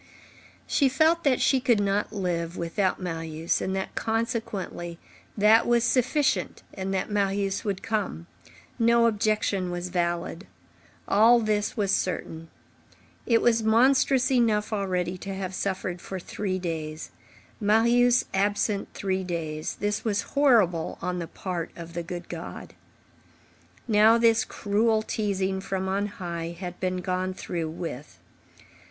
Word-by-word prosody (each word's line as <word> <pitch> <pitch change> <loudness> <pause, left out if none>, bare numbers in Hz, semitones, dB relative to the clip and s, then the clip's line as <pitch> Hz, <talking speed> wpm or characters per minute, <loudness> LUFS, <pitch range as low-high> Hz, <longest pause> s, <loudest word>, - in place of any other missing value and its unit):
She 275 -3 +2
felt 320 +5 +3
that 265 -3 +3
she 265 - +3
could 240 -4 +2
not 200 +1 0
live 175 -4 -2
without 180 +3 -1
Marius, 165 -2 -2
and 190 - -2
that, 190 - -3
consequently, 220 -6 -3 0.4
that 215 +2 +5
was 240 -1 +3
sufficient 265 +4 +1
and 190 0 -4
that 190 +2 -2
Marius 200 -1 0
would 200 -3 -3
come. 205 -6 -2 0.5
No 235 0 +4
objection 210 -4 +1
was 175 0 -4
valid. 175 0 -2 0.6
All 225 +4 +6
this 215 -1 -1
was 200 -2 +1
certain. 165 -4 -2 0.8
It 230 -2 +3
was 230 -1 +3
monstrous 255 +3 +3
enough 225 -4 +2
already 185 -3 -1
to 195 +1 -5
have 190 -1 -4
suffered 185 -2 -3
for 190 - -6
three 185 +1 -3
days. 160 -3 -5 0.5
Marius 235 +3 +4
absent 205 +1 0
three 190 -1 -1
days, 160 -4 -4
this 205 +1 -2
was 205 -3 0
horrible 220 - +3
on 180 0 -2
the 170 - -4
part 175 -2 -4
of 170 -1 -9
the 170 - -3
good 175 +1 -7
God. - - -8 1.1
Now, 220 +1 +6
this 230 -1 +4
cruel 215 +1 +1
teasing 195 -3 -1
from 190 0 -3
on 200 +2 0
high 170 -4 -6
had 180 -2 -6
been 185 -1 -1
gone 185 +1 -2
through 165 -4 -4
with. 160 -4 -7
195 Hz, 135 wpm, -26 LUFS, 180-225 Hz, 1.1 s, All